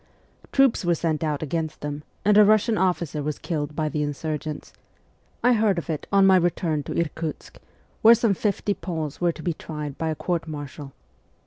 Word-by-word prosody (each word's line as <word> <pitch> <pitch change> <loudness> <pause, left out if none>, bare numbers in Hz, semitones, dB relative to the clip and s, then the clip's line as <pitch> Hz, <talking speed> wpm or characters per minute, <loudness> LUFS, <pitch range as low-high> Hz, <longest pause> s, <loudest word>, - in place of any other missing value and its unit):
Troops 270 -6 +3
were 175 -1 +2
sent 160 -1 -1
out 150 -1 -1
against 160 +1 -3
them, 145 0 -4 0.2
and 210 0 +5
a 210 - +8
Russian 215 +2 +4
officer 175 -5 0
was 150 +1 -3
killed 150 -3 -3
by 155 -1 0
the 150 0 -2
insurgents. 150 +1 -4 0.7
I 245 - +5
heard 215 -4 +2
of 170 0 -3
it 155 - -4
on 195 -1 +5
my 190 -1 +6
return 170 -3 0
to - - -2
Irkutsk, 160 -1 -4 0.4
where 230 +1 +8
some 225 -2 +2
fifty 205 +1 -1
Poles 165 -6 -5
were 175 -1 +3
to 160 - -11
be 175 - 0
tried 150 -2 -7
by 160 - -1
a 155 - -1
court 170 0 -2
martial. 145 -2 -7
165 Hz, 190 wpm, -24 LUFS, 150-190 Hz, 0.7 s, a